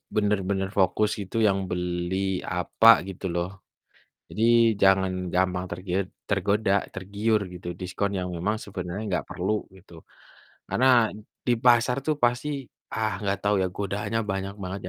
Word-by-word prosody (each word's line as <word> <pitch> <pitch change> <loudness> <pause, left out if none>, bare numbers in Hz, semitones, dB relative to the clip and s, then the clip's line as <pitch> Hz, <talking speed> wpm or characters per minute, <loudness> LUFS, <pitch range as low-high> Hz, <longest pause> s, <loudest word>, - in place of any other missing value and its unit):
bener-bener 100 -2 0
fokus 105 +2 +2
itu 100 +2 -5
yang 95 -1 0
beli 90 +2 -1
apa 100 +5 +5
gitu 95 0 -7
loh. 90 +3 -3 0.7
Jadi 110 - -3 0.4
jangan 95 -1 +4 0.2
gampang 90 0 +1
tergiud 90 +2 -2 0.2
tergoda 100 +1 +1 0.2
tergiur 105 +3 0
gitu 85 0 -8
diskon 95 +2 -2
yang 90 - -3
memang 100 +6 -1
sebenarnya 95 +1 -5 0.2
gak - - -15
perlu 95 +4 -1 0.2
gitu 95 -1 -19 0.8
karena 130 - +1 0.6
di 125 - +4
pasar 120 +1 +4
tuh 155 0 +1
pasti, 120 +4 +1 0.4
ah, 110 -1 0
gak 100 0 0
tau 105 0 +1
ya 95 - +1
godaannya 100 +3 -2
banyak 95 0 -3
banget 95 +1 -5
95 Hz, 135 wpm, -26 LUFS, 90-105 Hz, 0.8 s, apa